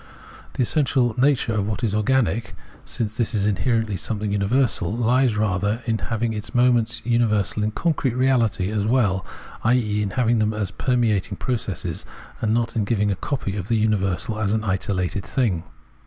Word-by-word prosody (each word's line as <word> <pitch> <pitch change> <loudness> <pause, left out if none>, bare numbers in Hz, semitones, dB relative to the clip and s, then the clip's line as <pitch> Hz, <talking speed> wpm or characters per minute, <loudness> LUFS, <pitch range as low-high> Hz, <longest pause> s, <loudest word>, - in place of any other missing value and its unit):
The 130 - 0
essential 130 -3 +2
nature 130 -2 +2
of 105 -2 0
what 105 +2 -3
is 110 -4 +1
organic, 105 -2 +1 0.3
since 110 -2 -3
this 115 -2 0
is 100 -1 +2
in 105 - +3
herently 115 -5 0
something 105 -1 -2
universal, 105 -1 +1
lies 120 +1 +2
rather 105 +2 0
in 115 -2 0
having 115 0 -2
its 105 +2 -6
moments 120 -2 +2
universal 110 -4 +1
in 105 - +1
concrete 135 0 -1
reahty 115 -6 +1
as 105 0 0
well, 105 -7 +2 0.4
i.e. 110 -3 +2
in 105 - -1
having 120 -2 +3
them 110 0 +1
as 100 -3 -2
permeating 110 -5 0
processes, 100 -9 -3 0.4
and 110 - +1
not 115 +1 0
in 110 - +1
giving 105 -1 +1
a - - 0
copy 115 -3 -3
of 95 -3 -4
the 115 - +1
universal 105 0 0
in 105 -2 0
an 110 +1 0
isolated 95 -1 -1
thing. 105 -11 -1
110 Hz, 170 wpm, -23 LUFS, 100-120 Hz, 0.4 s, in